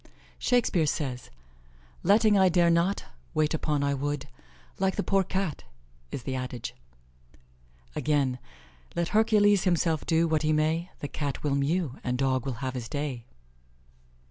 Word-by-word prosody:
Shakespeare 215 Hz, -10 st, +2 dB
says: 130 Hz, -5 st, -3 dB, 0.7 s
"Letting 210 Hz, +2 st, +4 dB
'I 190 Hz, -1 st, +5 dB
dare 175 Hz, -1 st, +4 dB
not' 170 Hz, +4 st, +1 dB, 0.3 s
wait 155 Hz, 0 st, +2 dB
upon 150 Hz, -2 st, 0 dB
'I 140 Hz, 0 st, +1 dB
would,' 145 Hz, +1 st, -2 dB, 0.5 s
Like 190 Hz, 0 st, +1 dB
the 205 Hz, -, -1 dB
poor 195 Hz, -1 st, +2 dB
Cat 190 Hz, -, -3 dB, 0.5 s
i'the 130 Hz, +1 st, -4 dB
adage." 125 Hz, -2 st, -4 dB, 1.2 s
Again: 140 Hz, -4 st, +1 dB, 0.6 s
"Let 170 Hz, 0 st, 0 dB
Hercules 210 Hz, -2 st, +4 dB
himself 165 Hz, -3 st, +1 dB
do 165 Hz, 0 st, +3 dB
what 155 Hz, -2 st, +1 dB
he 155 Hz, -1 st, +2 dB
may, 160 Hz, +3 st, +1 dB
The 145 Hz, -, -2 dB
Cat 140 Hz, -1 st, -4 dB
will 145 Hz, -2 st, +1 dB
mew, 140 Hz, 0 st, 0 dB
and 125 Hz, 0 st, -1 dB
Dog 130 Hz, -1 st, 0 dB
will 125 Hz, -1 st, -4 dB
have 130 Hz, -, -2 dB
his 120 Hz, -3 st, -5 dB
day." 140 Hz, -6 st, -3 dB
155 Hz, 145 wpm, -28 LUFS, 140-185 Hz, 1.2 s, I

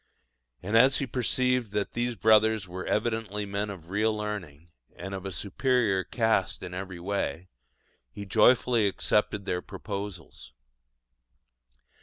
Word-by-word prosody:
And 105 Hz, +4 st, -1 dB
as 130 Hz, +4 st, +6 dB
he 140 Hz, -, -1 dB
perceived 125 Hz, -2 st, 0 dB
that 105 Hz, -1 st, -1 dB
these 120 Hz, 0 st, -1 dB
brothers 110 Hz, -2 st, +4 dB
were 90 Hz, +1 st, -6 dB
evidently 105 Hz, -2 st, -1 dB
men 100 Hz, +1 st, -3 dB
of 90 Hz, -3 st, -9 dB
real 105 Hz, +3 st, +2 dB
learning, 90 Hz, -7 st, -6 dB, 0.3 s
and 95 Hz, +3 st, -7 dB
of 95 Hz, 0 st, -5 dB
a -, -, -5 dB
superior 105 Hz, 0 st, +1 dB
cast 110 Hz, -2 st, 0 dB
in 90 Hz, -1 st, -7 dB
every 95 Hz, -1 st, -6 dB
way, 95 Hz, -1 st, -3 dB, 0.6 s
he 100 Hz, -, -8 dB
joyfully 115 Hz, +1 st, +4 dB
accepted 105 Hz, 0 st, 0 dB
their 90 Hz, -, -1 dB
proposals. 100 Hz, -5 st, -7 dB
105 Hz, 130 wpm, -28 LUFS, 95-110 Hz, 0.6 s, as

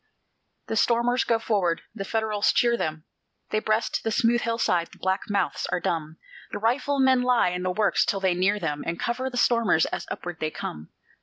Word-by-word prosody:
The 225 Hz, -, -3 dB
stormers 240 Hz, +2 st, +2 dB
go 230 Hz, -, +2 dB
forward 195 Hz, -7 st, 0 dB
the 205 Hz, -3 st, -5 dB
Federals 215 Hz, 0 st, +1 dB
cheer 235 Hz, -1 st, +3 dB
them; 155 Hz, -7 st, -3 dB, 0.5 s
They 215 Hz, -, +2 dB
breast 215 Hz, +1 st, -1 dB
the -, -, 0 dB
smooth 240 Hz, 0 st, +2 dB
hillside 225 Hz, -7 st, 0 dB
the -, -, -18 dB
black 190 Hz, +2 st, -2 dB
mouths 200 Hz, -3 st, -1 dB
are 180 Hz, -, +1 dB
dumb; 160 Hz, -2 st, -3 dB, 0.3 s
The -, -, -3 dB
riflemen 260 Hz, +3 st, +2 dB
lie 250 Hz, -6 st, +3 dB
in 180 Hz, 0 st, -3 dB
the 185 Hz, -, -1 dB
works 200 Hz, +2 st, +2 dB
till 195 Hz, -, -1 dB
they 190 Hz, -2 st, +2 dB
near 190 Hz, +4 st, +1 dB
them, 150 Hz, -4 st, -3 dB
And 170 Hz, 0 st, -4 dB
cover 255 Hz, +2 st, -2 dB
the 250 Hz, -, -6 dB
stormers 230 Hz, -9 st, +3 dB
as -, -, -5 dB
upward 175 Hz, -1 st, -6 dB
they 155 Hz, -, -1 dB
come. 75 Hz, -, -7 dB
210 Hz, 190 wpm, -25 LUFS, 175-235 Hz, 0.5 s, cheer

